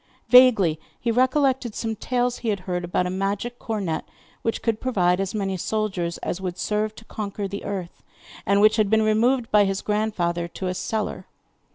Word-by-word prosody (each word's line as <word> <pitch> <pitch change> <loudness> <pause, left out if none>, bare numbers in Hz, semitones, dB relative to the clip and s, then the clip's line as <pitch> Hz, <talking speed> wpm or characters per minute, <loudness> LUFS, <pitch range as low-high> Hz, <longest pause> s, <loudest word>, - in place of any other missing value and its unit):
Vaguely 225 -11 +6 0.2
he 235 - 0
recollected 260 -1 +2
some 225 -1 -2
tales 245 +2 -1
he 230 - -2
had 200 -3 -1
heard 180 -1 -3
about 175 +1 0
a 180 - -2
magic 200 +6 -2
cornet 200 -8 -2 0.4
which 225 - -2
could 225 -2 0
provide 180 -8 +2
as 195 +1 -2
many 195 -2 -1
soldiers 190 -4 -2
as 180 - -3
would 180 -1 -4
serve 215 0 -1
to 225 - -13
conquer 205 -2 -4
the 200 +1 -6
earth, 190 -4 -5 0.4
and 200 +1 +3
which 215 +1 +5
had 215 -2 +2
been 220 +1 +4
removed 230 +3 +2
by 210 -1 +6
his 195 0 -1
grandfather 180 -5 -1
to 185 - -7
a 180 - -1
cellar. 215 +4 -3
210 Hz, 185 wpm, -24 LUFS, 185-225 Hz, 0.4 s, Vaguely